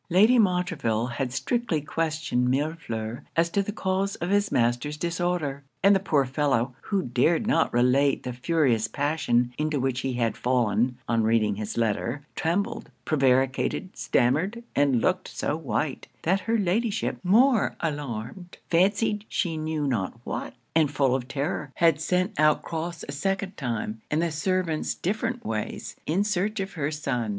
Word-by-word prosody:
Lady 215 +8 +5
Montreville 180 - +1
had 125 +1 -3
strictly 235 - 0
questioned 150 -5 -1
Millefleur 130 -6 -2
as 170 0 +2
to 200 - +2
the 200 - -3
cause 195 -1 -1
of 175 +3 -3
his 205 0 +2
master's 120 +5 +1
disorder; 170 -4 -1 0.2
and 200 +1 +7
the - - +3
poor 155 -8 +2
fellow, 130 -2 0
who 195 -3 0
dared 130 - +2
not 165 -7 +2
relate 130 +3 +3
the 125 - -4
furious 125 -4 +1
passion 125 -2 0
into 155 -1 0
which 130 -1 0
he 130 -1 -2
had 120 -2 0
fallen 120 -1 +1
on 115 -1 +2
reading 110 -2 +2
his 105 +1 -4
letter, 115 +5 -1
trembled, 175 +5 -1 0.2
prevaricated, 135 +6 +1
stammered, 170 - +1
and 140 -4 +3
looked 185 +6 +1
so 145 - -2
white, 150 -2 -2 0.2
that 190 +4 +2
her 230 +3 0
Ladyship, 210 +3 0
more 230 +5 +4
alarmed, 145 - -5
fancied 200 +4 +2
she 170 -3 -1
knew 155 -1 -2
not 115 -9 -2
what; - - -5 0.2
and 160 -3 +4
full 135 -2 +2
of 130 -1 -2
terror, 140 0 -3
had 165 -3 +3
sent 185 +4 0
out 155 -1 +4
Crofts 165 0 -4
a - - -4
second 195 +6 -2
time, 115 -4 -3
and 150 - +1
the 170 - 0
servants 165 0 -1
different 220 +6 -2
ways, 110 -1 -4
in 180 +6 +2
search 205 +1 -1
of 195 0 -3
her 150 -4 -1
son. 135 -7 -2
150 Hz, 160 wpm, -26 LUFS, 125-185 Hz, 0.2 s, and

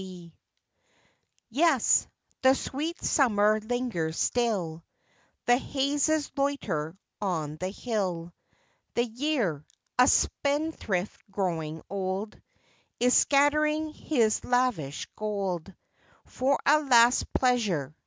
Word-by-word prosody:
Yes, 285 -1 +3 0.3
the 260 0 +5
sweet 310 +6 -4
summer 215 -5 +3
lingers 215 -9 -2
still; 190 -10 -1 0.6
The 245 0 +5
hazes 285 +3 0
loiter 195 - -2 0.2
on 160 -6 -2
the 185 +3 -3
hill; 190 -6 -3 0.6
The 240 - +3
year, 235 - -1 0.4
a 250 - +7
spendthrift 285 - 0
growing 165 -5 -3
old, 195 +2 -4 0.6
Is 250 +1 +3
scattering 300 +2 +3
his 230 -10 0
lavish 245 - 0
gold 195 -4 -3 0.5
For 270 +2 0
a 300 +2 +5
last 245 -4 +4
pleasure. 200 - +1
230 Hz, 90 wpm, -27 LUFS, 185-275 Hz, 0.6 s, a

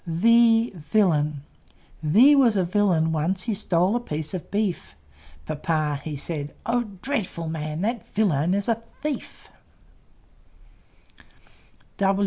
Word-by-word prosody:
V 230 +6 +4 0.2
V 155 - +1
was 250 -7 +4
a 190 - +2
Villain; 175 -4 +1
once 170 +4 -1
He 230 - -1
stole 190 0 +1
a - - +1
piece 155 -7 -5
of 180 -4 -6
beef. 200 - -2 0.5
Papa 155 -1 -2
he 155 -2 -5
said, 145 0 -5
"Oh, 240 +1 0 0.2
dreadful 210 - -3
man! 155 0 -4
That 230 +3 -2
Villain 180 -4 +1
is 200 0 -1
a 230 - +4 0.3
Thief!" 300 -2 -5
180 Hz, 110 wpm, -24 LUFS, 155-225 Hz, 0.5 s, V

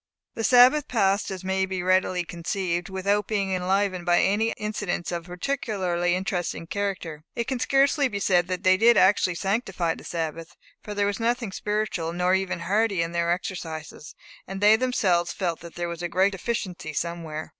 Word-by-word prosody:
The 225 - -4
Sabbath 255 +5 +6
passed, 200 -3 +1
as 190 -1 -6
may 190 0 0
be 185 -1 -3
readily 185 -1 +2
conceived, 175 +1 -3
without 200 +2 0
being 200 -3 -1
enlivened 185 0 0
by 175 0 +3
any 210 +4 +2
incidents 205 -5 -3
of 170 -1 -4
a - - -16
particularly 180 -4 -1
interesting 185 -3 -3
character. 180 -5 -4
It 235 - 0
can 260 0 -2
scarcely 275 +2 +3
be 200 -5 -4
said 180 -3 +2
that 185 0 -3
they 185 0 +5
did 230 +2 +5
actually 185 -1 +4
sanctify 195 -3 -1
the - - -12
Sabbath, 165 -1 -5 0.2
for 210 - -7
there 205 0 +1
was 200 +1 -2
nothing 235 -2 -1
spiritual, 210 -5 -2
nor 180 +1 +1
even 190 -2 -1
hearty 200 -1 +1
in 165 - -4
their 170 0 0
exercises; 160 -4 -5 0.3
and 195 +1 -5
they 210 +2 +6
themselves 190 -8 +1
felt 175 -4 -2
that 170 0 -11
there 175 0 -3
was 170 0 -6
a 175 - -3
great 190 +3 +2
deficiency 190 -6 -4
somewhere. 165 -1 -4
185 Hz, 180 wpm, -25 LUFS, 175-210 Hz, 0.3 s, Sabbath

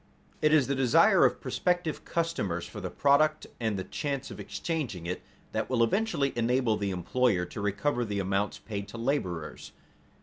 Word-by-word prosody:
It 155 - +4
is 155 -4 +5
the 140 - 0
desire 130 -3 +5
of - - +2
prospective 175 -3 -1
customers 135 - -1
for 105 - -8
the 95 - -3
product, 155 +5 +3
and 110 -4 -1
the 95 - -3
chance 140 +8 -3
of - - -9
exchanging 135 - -3
it, 90 +1 -3 0.3
that 110 -1 -2
will 120 -3 +3
eventually 145 - +1
enable 120 -1 +2
the 100 -1 -2
employer 95 +2 +1
to 100 - -7
recover 120 +6 0
the 105 -3 -3
amounts 100 +1 0
paid 100 -2 -6
to 110 - -9
laborers. 105 - -3
115 Hz, 170 wpm, -29 LUFS, 100-140 Hz, 0.3 s, is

